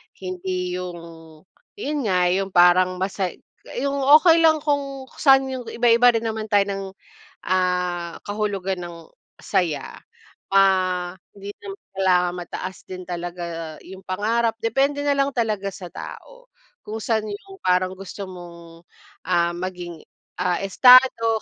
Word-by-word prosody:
Hindi 185 -1 -4
yung 180 -1 -6 0.8
yun 300 -8 -3
nga, 180 -2 +2
yung 195 +1 0
parang 180 +1 +5
masay 190 -1 -3 0.4
yung 280 +1 -1 0.2
okey 330 +1 +5
lang 320 -1 +5
kung 280 -2 -2 0.2
saan 270 -2 +6
yung 260 -1 -5
iba-iba 240 +1 +4
rin 230 0 -1
naman 220 -1 -3
tayo 200 -1 +4
ng, 195 -1 -3 0.6
ah, 180 -2 -1
kahulugan 200 -2 -2
ng 170 -2 -10 0.3
saya. 160 -7 -1 0.6
Ah, 185 -2 +2 0.2
hindi 200 0 -8
naman 400 -1 -8 0.2
kailangan 180 -2 +2
mataas 180 +1 -7
din 185 -1 -8
talaga 170 -2 -6
yung 190 +1 -11
pangarap. 225 +4 0
Depende 270 +5 +1
na 285 -1 +2
lang 275 0 +1
talaga 215 -4 -1
sa 180 -2 -9
tao - - -11 0.4
kung 220 +1 -6
saan 220 -1 0
yung 300 - -9
parang 185 0 +2
gusto 195 +1 -7
mong, 170 -2 -12 0.4
ah, 170 -1 +2
maging 175 -2 -6 0.4
ah, 180 -1 0
estado 230 +1 +6
190 Hz, 130 wpm, -22 LUFS, 180-230 Hz, 0.8 s, saan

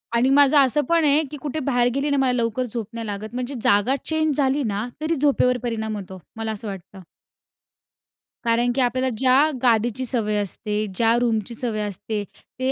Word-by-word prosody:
आणि 250 +3 +3
माझं 285 +1 +5
असं 275 +2 +3
पण 335 -1 +3
आहे, 295 +2 +4
की 295 - -6
कुठे 300 +1 -3
बाहेर 245 -3 +1
गेली 280 +2 0
ना, 280 - +1
मला 265 -2 +2
लवकर 235 0 -1
झोप 230 -3 -5
नाही 230 -1 -5
लागत, 210 +2 -5
म्हणजे 250 +2 -4
जागा 205 +7 +3
चेंज 315 -2 +1
झाली 275 +1 +1
ना, 215 0 -2
तरी 325 +1 0
झोपेवर 265 -3 +2
परिणाम 220 -2 -3
होतो, 190 -2 -9 0.2
मला 225 0 -3
असं 215 0 -6
वाटतं. 195 0 -9 1.4
कारण 235 +1 +2
की 265 - +2
आपल्याला 255 +1 +1
ज्या 265 +4 +4
गादीची 240 +1 +1
सवय 225 -4 0
असते, 210 +2 -3
ज्या 230 +2 +3
रूमची 230 -2 -1
सवय 225 -4 -2
असते, 205 +2 -4 0.4
ते 260 +1 0
245 Hz, 185 wpm, -22 LUFS, 220-270 Hz, 1.4 s, माझं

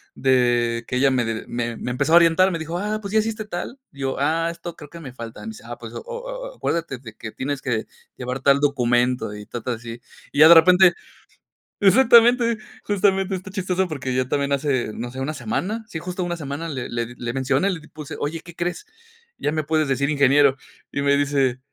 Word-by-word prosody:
de 120 -3 +2
que 125 - -3
ella 135 +1 +3
me 125 -2 +1
d 115 -1 -3
me 120 -1 -3
me 125 - -4
empezó 140 +6 0
a - - +9
orientar, 175 +2 +5
me 170 - -2
dijo: 165 +2 -4
"Ah, 210 +2 -2
¿pues 200 -1 -6
ya 220 - +5
hiciste 215 0 -2
tal?", 210 +5 -6
y 140 - -18
yo: 135 0 -1
"Ah, 160 +4 +1
esto 170 0 -8
creo 150 - -11
que 170 +2 -11
me 135 -5 -8
falta.", 115 -2 -9
me - - -8
dice: 220 -1 -9
"Ah, - - -7
pues - - -9
o - - -5
o - - -6
a - - -20
acuérdate 160 -7 -2
de 115 -4 -11
que 110 0 -8
tienes 140 0 -3
que 115 -4 -2 0.3
llevar 125 +1 -5
al 140 0 +5
documento.", 125 -5 +1
y 105 0 -9
cosas 120 +1 -4
así. 115 +1 -9 0.3
Y 145 - -3
ya 155 - +10
de 170 - +10
repente 180 +2 +7 0.9
exactamente, 235 +2 +5 0.3
justamente 195 -1 +1
está 185 +1 -7
chistoso 185 -1 -1
porque 135 -5 -4
ya 130 0 0
también 140 +1 0
hace, 135 -5 0
no 120 +1 -5
sé, 130 - -8
una 145 +4 -2
semana, 220 +4 -3
sí, 170 - -6
justo 180 +2 -4
una 175 -1 -3
semana 150 +2 -5
le 130 -4 -5
le 120 -1 -2
di 120 - -12
le 120 0 -4
mencioné 135 +8 +1
y 180 - -4
le 150 - -16
puse: 150 -2 -8
"Oye, 155 +3 -3
¿qué 170 0 -13
crees?, 175 - -3 0.5
ya 145 - -1
me 155 0 -1
puedes 155 -1 +1
decir 140 +2 +1
ingeniero". 140 -1 +4 0.4
Y 140 - -2
me 140 0 +3
dice: 135 -3 +1
145 Hz, 225 wpm, -22 LUFS, 130-180 Hz, 0.9 s, ya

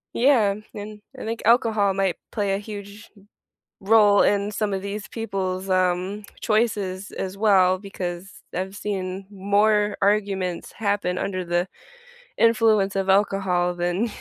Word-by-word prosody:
Yeah, 235 -6 +4 0.2
and 210 0 -8 0.2
I - - -6
think 225 +1 -4
alcohol 220 -3 +3
might 195 -2 0
play 200 -3 -1
a 195 - -1
huge 205 0 -9 0.7
role 205 0 +5
in 200 0 +1
some 210 0 -2
of 190 -1 -2
these 205 +1 -5
people's, 195 -4 -3
um, 185 +2 0 0.2
choices 205 -4 0
as 190 0 -5
well 190 -3 +4
because 185 -2 -6 0.3
I've 190 +2 -4
seen 190 -2 -4
more 205 +1 +2
arguments 195 -3 0
happen 200 -4 -1
under 185 -2 -3
the 175 +1 0 0.7
influence 220 -4 +3
of 195 0 -1
alcohol 190 -3 +2
than 175 +6 0
200 Hz, 130 wpm, -23 LUFS, 185-210 Hz, 0.7 s, role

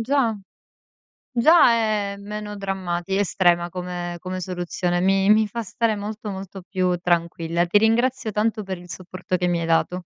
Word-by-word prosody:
già 235 -2 +1 1.0
già 310 +5 +6
è 215 -3 0
meno 210 +1 -6
drammatica, 190 -1 -2
estrema 175 -3 +2
come 180 -1 -5
come 185 +2 -5
soluzione. 175 0 -2
Mi 195 +2 +3
mi 215 0 +5
fa 230 +3 -4
stare 225 +1 -1
molto, 210 +1 -5
molto 195 -1 -7
più 185 -2 +1
tranquilla. 170 -1 0
Ti 190 +4 +4
ringrazio 235 +2 +1
tanto 215 +1 0
per 190 -2 -5
il 175 0 -13
supporto 185 0 -4
che 180 0 -1
mi 175 -1 +1
hai 165 - -2
dato. 170 +2 +1
195 Hz, 160 wpm, -23 LUFS, 175-215 Hz, 1.0 s, già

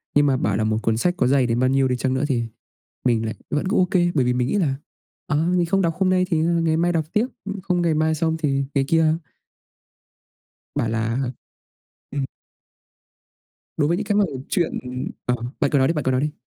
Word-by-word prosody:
Nhưng 145 0 +5
mà 135 -2 +3
bảo 100 -3 0
là 110 - 0
một 110 0 +1
cuốn 110 -1 +1
sách 180 +7 0
có - - +2
dày 130 -1 +3
đến 115 +1 0
bao 130 - +3
nhiêu 135 0 +3
đi 125 - 0
chăng 130 +1 0
nữa 130 +2 0
thì 125 -5 0 0.6
mình 115 -2 +2
lại 110 - -3 0.2
vẫn 150 +5 0
cứ 215 - +1
ô 185 - +5
kê, 175 -2 +3
bởi 135 -5 +3
vì 125 - +2
mình 125 0 0
nghĩ - - -1
là 160 -9 +1 0.5
"Ờ, 150 - 0 0.2
mình 175 -1 +2
không 195 +3 +2
đọc 165 -2 +1
hôm 190 -1 +2
nay 185 0 +3
thì 165 - +2
ngày 165 0 +2
mai 175 +1 +2
đọc 160 -2 0
tiếp, 215 +3 +2 0.2
ưm, 200 -1 -5
không 180 -2 0
ngày 165 -2 +2
mai 155 +1 +2
xong 160 +1 0
thì 140 -4 0
ngày 135 -1 +2
kia." 160 -1 +3 1.6
Bảo 130 -6 0
là 115 +2 -1 0.9
ừm. 140 -1 -1 1.5
Đối 145 -1 +2
với 170 +2 +1
những 215 - -2
cái 205 - 0
mẩu 160 -11 0
chuyện 175 -5 +1 0.5
ờ, 125 - +1 0.2
bạn 140 - +1
cứ 145 - +3
nói 130 -1 +4
đi, 165 - +1
bạn 150 - -2
cứ 130 - +2
nói 130 - +1
đi. 150 0 -1
150 Hz, 235 wpm, -22 LUFS, 130-175 Hz, 1.6 s, Nhưng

